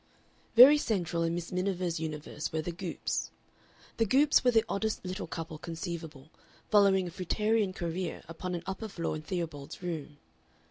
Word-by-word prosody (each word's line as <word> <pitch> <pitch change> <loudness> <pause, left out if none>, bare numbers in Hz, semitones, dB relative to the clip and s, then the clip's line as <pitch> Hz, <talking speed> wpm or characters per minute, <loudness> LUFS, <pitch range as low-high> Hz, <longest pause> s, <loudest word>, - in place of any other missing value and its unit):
Very 270 +5 +10
central 175 - -1
in 165 0 +1
Miss 175 -1 -5
Miniver's 180 -2 -1
universe 155 -1 -4
were 160 0 -1
the 175 - -3
Goopes. 175 0 -3 0.7
The 225 - +3
Goopes 280 +7 +4
were 250 - +5
the 225 -2 +4
oddest 215 0 -2
little 185 +1 -4
couple 160 -1 -6
conceivable, 165 -3 -6 0.4
following 195 -3 +5
a - - -6
fruitarian 210 +3 +1
career 175 0 -4
upon 180 +2 -4
an 170 - -5
upper 195 +3 -4
floor 170 -6 -3
in 155 - -5
Theobald's 160 -2 -5
Road. 155 -4 -5
175 Hz, 155 wpm, -30 LUFS, 165-200 Hz, 0.7 s, Very